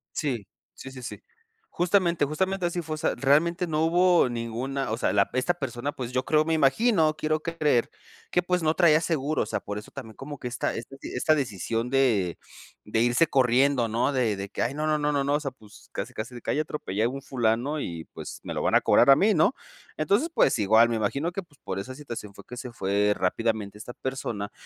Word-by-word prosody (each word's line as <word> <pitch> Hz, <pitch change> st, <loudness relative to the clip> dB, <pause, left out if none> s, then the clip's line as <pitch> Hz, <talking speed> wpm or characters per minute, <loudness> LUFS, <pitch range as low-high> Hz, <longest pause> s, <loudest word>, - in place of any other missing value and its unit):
Sí. 125 Hz, -9 st, -2 dB, 0.3 s
Sí, 135 Hz, -, -9 dB
sí, 130 Hz, -1 st, -10 dB
sí. 125 Hz, -, -7 dB, 0.5 s
Justamente 175 Hz, -3 st, +2 dB
justamente 185 Hz, +5 st, -1 dB
así 175 Hz, 0 st, -2 dB
fue. 155 Hz, 0 st, -4 dB
O -, -, -4 dB
sea, 160 Hz, -, 0 dB
realmente 160 Hz, +7 st, +2 dB
no 155 Hz, 0 st, 0 dB
hubo 175 Hz, -3 st, +4 dB
ninguna 120 Hz, +3 st, -3 dB
o 110 Hz, -, -1 dB
sea 95 Hz, -, 0 dB
la 100 Hz, -1 st, +2 dB
p, -, -, -2 dB
esta 170 Hz, +7 st, +1 dB
persona, 135 Hz, -2 st, -4 dB
pues, 125 Hz, -2 st, -5 dB
yo 130 Hz, 0 st, 0 dB
creo, 155 Hz, 0 st, +3 dB
me 165 Hz, 0 st, 0 dB
imagino, 160 Hz, -, +3 dB
quiero 155 Hz, 0 st, 0 dB
creer 155 Hz, -7 st, +1 dB, 0.4 s
que, 180 Hz, -, +2 dB
pues, 180 Hz, -1 st, 0 dB
no 155 Hz, 0 st, +2 dB
traía 165 Hz, -4 st, +5 dB
seguro, 155 Hz, -2 st, 0 dB
o -, -, -3 dB
sea, -, -, -2 dB
por 105 Hz, -, -6 dB
eso 105 Hz, -, -10 dB
también 115 Hz, -5 st, -9 dB
como 145 Hz, +1 st, -8 dB
que 125 Hz, -, -5 dB
esta 120 Hz, -, -2 dB
esta 130 Hz, +4 st, -7 dB
esta 155 Hz, +5 st, +1 dB
decisión 115 Hz, -, -2 dB
de 115 Hz, -10 st, +2 dB, 0.5 s
de 110 Hz, +2 st, -1 dB
irse 120 Hz, +7 st, +3 dB
corriendo, 130 Hz, -1 st, +3 dB
¿no? 115 Hz, +6 st, +1 dB
De 120 Hz, -6 st, +1 dB
de 100 Hz, 0 st, -5 dB
que -, -, -3 dB
"ay 125 Hz, +4 st, -1 dB
no, 155 Hz, +1 st, -2 dB
no, 155 Hz, 0 st, +2 dB
no, 150 Hz, 0 st, 0 dB
no, 140 Hz, -1 st, +1 dB
no", 145 Hz, +1 st, +1 dB
o 150 Hz, -, +1 dB
sea, 140 Hz, -3 st, -3 dB
pues, 105 Hz, -5 st, -18 dB
casi -, -, -5 dB
casi 115 Hz, +3 st, -6 dB
de 120 Hz, -, -8 dB
que -, -, -3 dB
"ahí -, -, 0 dB
atropellé 110 Hz, -9 st, -2 dB
a -, -, +3 dB
un 135 Hz, +1 st, -6 dB
fulano 125 Hz, +4 st, 0 dB
y, 85 Hz, -7 st, -5 dB
pues, -, -, -8 dB
me -, -, -5 dB
lo -, -, -2 dB
van -, -, +1 dB
a -, -, +7 dB
cobrar -, -, +5 dB
a 135 Hz, -, +9 dB
mí", 210 Hz, +5 st, +4 dB
¿no? 160 Hz, +11 st, +3 dB, 0.4 s
Entonces 260 Hz, +12 st, +1 dB
pues -, -, +3 dB
igual 110 Hz, +3 st, +5 dB
me 115 Hz, -, -1 dB
imagino 140 Hz, +10 st, -1 dB
que 195 Hz, +1 st, -4 dB
pues 150 Hz, -5 st, -25 dB
por 95 Hz, -, -4 dB
esa 130 Hz, +6 st, -6 dB
situación 120 Hz, -8 st, -8 dB
fue -, -, -13 dB
que 125 Hz, -, -9 dB
se 125 Hz, -2 st, -7 dB
fue 100 Hz, 0 st, +1 dB
rápidamente 105 Hz, +2 st, -1 dB
esta 120 Hz, +3 st, -8 dB
persona 120 Hz, -7 st, -4 dB
135 Hz, 235 wpm, -26 LUFS, 115-155 Hz, 0.5 s, a